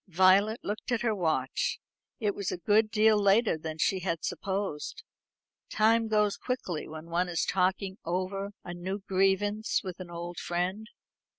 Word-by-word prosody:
Violet 190 Hz, +5 st, +4 dB
looked 210 Hz, +4 st, -4 dB
at 240 Hz, -, +1 dB
her 225 Hz, -2 st, +2 dB
watch. 205 Hz, -, 0 dB, 0.4 s
It 210 Hz, -4 st, 0 dB
was 200 Hz, -1 st, -3 dB
a -, -, -3 dB
good 210 Hz, +5 st, +3 dB
deal 215 Hz, -1 st, +4 dB
later 200 Hz, +1 st, +4 dB
than 160 Hz, 0 st, -6 dB
she 190 Hz, +4 st, +1 dB
had 170 Hz, -3 st, -2 dB
supposed. 195 Hz, -6 st, -3 dB, 0.7 s
Time 225 Hz, +1 st, +3 dB
goes 210 Hz, -2 st, +2 dB
quickly 250 Hz, -11 st, -3 dB
when 155 Hz, +1 st, -8 dB
one 175 Hz, +1 st, +1 dB
is 170 Hz, -2 st, 0 dB
talking 190 Hz, +2 st, 0 dB
over 185 Hz, +3 st, -2 dB
a 175 Hz, -, -6 dB
new 190 Hz, +3 st, -5 dB
grievance 195 Hz, +3 st, +1 dB
with 185 Hz, -2 st, -6 dB
an 180 Hz, -2 st, -8 dB
old 175 Hz, 0 st, -6 dB
friend. 185 Hz, +5 st, -2 dB
195 Hz, 160 wpm, -29 LUFS, 175-215 Hz, 0.7 s, Violet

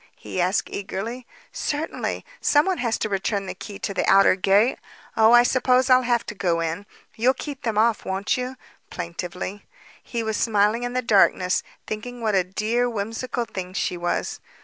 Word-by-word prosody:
he 185 Hz, -, -4 dB
asked 185 Hz, +3 st, +1 dB
eagerly. 225 Hz, +5 st, -5 dB, 0.2 s
"Certainly. 300 Hz, +2 st, -3 dB, 0.2 s
Someone 345 Hz, +5 st, +3 dB
has 235 Hz, -2 st, 0 dB
to -, -, -1 dB
return 195 Hz, 0 st, -1 dB
the -, -, -5 dB
key 205 Hz, -3 st, -9 dB
to 200 Hz, -, -4 dB
the -, -, 0 dB
outer 195 Hz, 0 st, +6 dB
gate. 200 Hz, +5 st, +3 dB, 0.4 s
Oh, 220 Hz, 0 st, +5 dB
I 240 Hz, 0 st, +8 dB
suppose 255 Hz, 0 st, +3 dB
I'll 255 Hz, 0 st, +7 dB
have 240 Hz, -2 st, +1 dB
to -, -, -6 dB
go 175 Hz, -4 st, 0 dB
in. 165 Hz, +5 st, -3 dB, 0.3 s
You'll 250 Hz, +4 st, +2 dB
keep 285 Hz, -3 st, -7 dB
them 225 Hz, -3 st, -2 dB
off, 225 Hz, 0 st, +3 dB
won't 190 Hz, +1 st, -1 dB
you?" 255 Hz, +1 st, -4 dB, 0.3 s
plaintively. 180 Hz, +3 st, -5 dB, 0.4 s
He 235 Hz, -2 st, -4 dB
was 220 Hz, -1 st, -1 dB
smiling 215 Hz, +1 st, +2 dB
in 245 Hz, 0 st, -3 dB
the 255 Hz, 0 st, -1 dB
darkness, 190 Hz, -4 st, +3 dB, 0.2 s
thinking 245 Hz, +3 st, -6 dB
what 220 Hz, -2 st, 0 dB
a 190 Hz, -2 st, +3 dB
dear, 220 Hz, +6 st, 0 dB
whimsical 225 Hz, +3 st, -3 dB
thing 185 Hz, -4 st, -6 dB
she 180 Hz, -, -1 dB
was. 175 Hz, 0 st, -2 dB
215 Hz, 175 wpm, -24 LUFS, 195-245 Hz, 0.4 s, I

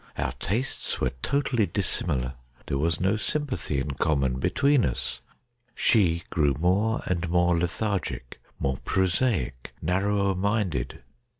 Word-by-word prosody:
Our 65 Hz, -, -1 dB
tastes 120 Hz, +8 st, -2 dB
were -, -, +1 dB
totally 130 Hz, -, +1 dB
dissimilar. 70 Hz, -10 st, 0 dB, 0.3 s
There 70 Hz, -, -1 dB
was 80 Hz, +2 st, +1 dB
no 95 Hz, +4 st, +2 dB
sympathy 130 Hz, -, -1 dB
in 70 Hz, +2 st, -2 dB
common 70 Hz, -3 st, +1 dB
between 140 Hz, -, +3 dB
us. 60 Hz, -1 st, -2 dB, 0.5 s
She 85 Hz, -7 st, +3 dB
grew 75 Hz, -4 st, +2 dB
more 100 Hz, +7 st, +2 dB
and 90 Hz, -2 st, -1 dB
more 90 Hz, 0 st, +3 dB
lethargic, 90 Hz, -, -2 dB, 0.2 s
more 65 Hz, -1 st, -1 dB
prosaic, 90 Hz, -, 0 dB
narrower 100 Hz, +3 st, +1 dB
minded. 95 Hz, -, -1 dB
90 Hz, 120 wpm, -26 LUFS, 70-105 Hz, 0.5 s, between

